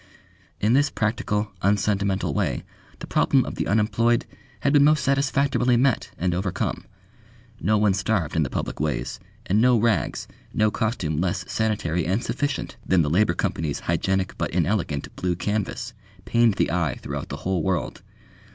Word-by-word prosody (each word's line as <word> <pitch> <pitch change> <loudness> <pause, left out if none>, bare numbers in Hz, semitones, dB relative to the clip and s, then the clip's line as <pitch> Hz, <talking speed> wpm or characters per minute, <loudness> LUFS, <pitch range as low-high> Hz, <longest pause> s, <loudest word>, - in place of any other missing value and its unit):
In 105 +5 +2
this 140 +2 +4
practical, 110 -2 -1
unsentimental 100 -1 +1
way - - -1 0.3
the - - -7
problem - - +2
of - - -5
the - - -2
unemployed 115 +3 +2 0.4
had 140 - +2
been 145 -1 +6
most 150 -2 +4
satisfactorily 140 -2 +2
met 130 -1 +2
and 90 +1 0
overcome. 95 +1 -2 0.7
No 110 +1 +2
one 105 -2 +3
starved 95 -5 -1
in 80 - +2
the 70 - 0
public - - -4
ways, 75 0 -2 0.3
and 105 +4 +2
no 125 0 +5
rags, 115 0 0 0.3
no 110 0 +3
costume 90 - -1
less 95 +1 -1
sanitary 95 -7 -1
and 100 +7 0
sufficient 145 -2 -2
than 90 -3 +3
the 75 - -1
Labour 90 0 +3
Company's 75 -2 -2
hygienic 95 -1 0
but - - 0
inelegant 90 -8 -1
blue 90 -1 -1
canvas, 105 +5 -3 0.3
pained 115 -3 +3
the - - +1
eye 80 -6 0
throughout - - -5
the - - -5
whole 95 -2 +1
world. 95 0 -2
105 Hz, 160 wpm, -24 LUFS, 90-115 Hz, 0.7 s, been